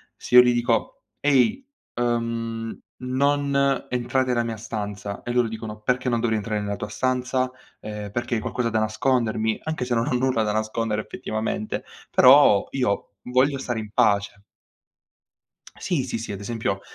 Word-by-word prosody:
se 125 - -3
io 125 - +12
gli 125 0 +3
dico: 120 -2 0 0.2
"Ehi! 145 - +2 0.3
Uhm, 115 -1 -2 0.2
non 140 +1 +1
entrate 125 +1 0
nella 120 -1 +2
mia 115 -1 -4
stanza". 105 -2 -5
E 120 - -3
loro 120 -1 +2
dicono: 110 -1 -7
"Perché 125 +3 0
non 120 -1 +1
dovrei 115 -1 +1
entrare 105 0 -2
nella 100 0 -3
tua 105 - -6
stanza? 130 +1 0 0.3
Ehm, 105 -1 -6
perché 120 +1 -2
hai 110 - -1
qualcosa 120 -2 -1
da 110 - 0
nascondermi?" 110 0 0
Anche 155 -5 -2
se 120 - 0
non 115 0 0
ho - - 0
nulla 125 -2 +1
da 105 - 0
nascondere 110 0 -1
effettivamente, 110 0 -4 0.3
però 130 -6 +7
io 115 -6 -1
voglio 130 +3 +2
stare 120 -3 -3
in 110 -1 -6
pace. 100 -1 +1 1.3
Sì, 165 -9 -1
sì, 125 - -3
sì, 115 -2 -5
ad 100 - -6
esempio 105 -3 -2
115 Hz, 165 wpm, -24 LUFS, 110-125 Hz, 1.3 s, io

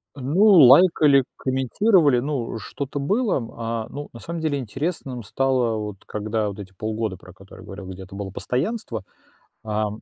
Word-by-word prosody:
Ну, 145 +10 +2
лайкали, 150 - +7
комментировали, 135 - +2
ну, 130 -3 -3
э, - - -3
что-то 140 +6 -5
было. 200 - +1 0.2
А, 115 -1 -3
ну, 145 +1 -7
на 115 - -10
самом 170 +5 -6
деле 145 -3 0
интересным 130 - -4
стало, 125 0 0
вот 105 -2 -6
когда 105 0 -2
вот 100 +1 -8
эти 95 -1 -9
полгода, 110 -1 -3
про 95 - -15
которые 95 +2 -14
я - - -13
говорил, 95 -1 -9
где 95 0 -8
это 95 +1 -12
было 100 -1 -5
постоянство, 125 - -3 0.6
а 105 0 -1
125 Hz, 170 wpm, -23 LUFS, 105-145 Hz, 0.6 s, лайкали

